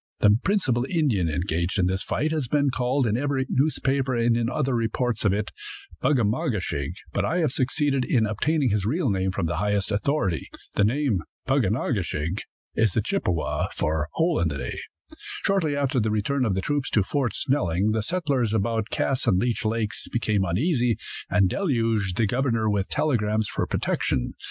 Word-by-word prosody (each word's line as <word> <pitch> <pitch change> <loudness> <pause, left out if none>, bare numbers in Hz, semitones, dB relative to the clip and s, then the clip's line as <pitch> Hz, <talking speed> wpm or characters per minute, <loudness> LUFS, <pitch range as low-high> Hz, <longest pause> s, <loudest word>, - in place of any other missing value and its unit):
The 105 0 +6
principal 145 - +1
Indian 130 - +1
engaged 85 +3 -1
in 95 - +3
this 95 +1 0
fight 155 +1 -1
has 155 -5 -1
been 140 +1 +2
called, 130 +2 +1
in 110 -1 +1
every 135 +1 0
newspaper 135 -2 +1
and 115 0 +2
other 135 -1 0
reports 115 -1 0
of 100 - +4
it, 105 +2 -1 0.5
Bug 150 - +2
a 120 - +2
ma 110 +5 0
ge - - 0
shig; 70 -4 -3 0.2
but - - 0
I 170 - 0
have 160 -7 +2
succeeded 135 +1 +1
in 120 -3 +2
obtaining 130 +5 +1
his 105 -1 +1
real 145 - +1
name 95 -1 0
from 95 -1 -2
the 85 - -2
highest 105 0 0
authority. 100 - 0 0.3
The - - +3
name, 120 - +1 0.2
Pug 135 -5 +2
on 105 - +1
a 130 - -1
ke 100 -5 0
shig, 80 +4 -3 0.3
is 110 -5 +2
the - - +2
Chippewa 85 -4 -1
for 75 -1 -1
"Hole 165 0 +1
in 85 - +2
the 70 -3 -3
day." - - -4 0.7
Shortly 185 -7 +2
after 140 -2 +1
the 110 -1 +1
return 115 +6 0
of 100 -5 +1
the 95 - 0
troops 145 +4 -1
to 105 - +2
Fort 135 +3 -1
Snelling 100 - +1
the 110 0 0
settlers 135 - 0
about 110 +1 0
Cass 135 -2 0
and 90 - +4
Leech 120 +3 0
lakes 110 -1 -1
became 110 -4 0
uneasy, 120 - +1 0.3
and 100 -2 +4
deluged 115 - 0
the 115 - +3
governor 120 -1 0
with 100 -2 0
telegrams 110 -7 +1
for - - -2
protection. 60 -1 -1
115 Hz, 190 wpm, -25 LUFS, 100-135 Hz, 0.7 s, The